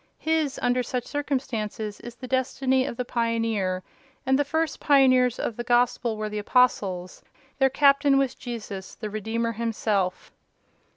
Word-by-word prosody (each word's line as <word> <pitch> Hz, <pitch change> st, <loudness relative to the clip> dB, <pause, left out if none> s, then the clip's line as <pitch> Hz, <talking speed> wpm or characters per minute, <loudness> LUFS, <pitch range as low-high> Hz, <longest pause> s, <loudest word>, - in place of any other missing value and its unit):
His, 315 Hz, -3 st, 0 dB
under 245 Hz, +1 st, +2 dB
such 250 Hz, 0 st, -3 dB
circumstances, 225 Hz, -7 st, -3 dB
is 240 Hz, -1 st, -9 dB
the 255 Hz, +1 st, -9 dB
destiny 260 Hz, 0 st, +1 dB
of 235 Hz, -, -5 dB
the 250 Hz, -, -2 dB
pioneer; 225 Hz, -6 st, -1 dB, 0.4 s
and 265 Hz, +1 st, +3 dB
the -, -, +4 dB
first 320 Hz, +3 st, -1 dB
pioneers 255 Hz, -4 st, +4 dB
of 225 Hz, -, -3 dB
the 240 Hz, -, -3 dB
Gospel 240 Hz, -1 st, +1 dB
were 215 Hz, 0 st, -3 dB
the 210 Hz, 0 st, -4 dB
Apostles—their 250 Hz, +3 st, 0 dB
captain 280 Hz, 0 st, +4 dB
was 270 Hz, -2 st, +1 dB
Jesus, 215 Hz, -6 st, -7 dB
the 215 Hz, -2 st, -6 dB
Redeemer, 225 Hz, +2 st, -2 dB
Himself." 210 Hz, -4 st, -1 dB
240 Hz, 140 wpm, -25 LUFS, 215-265 Hz, 0.4 s, the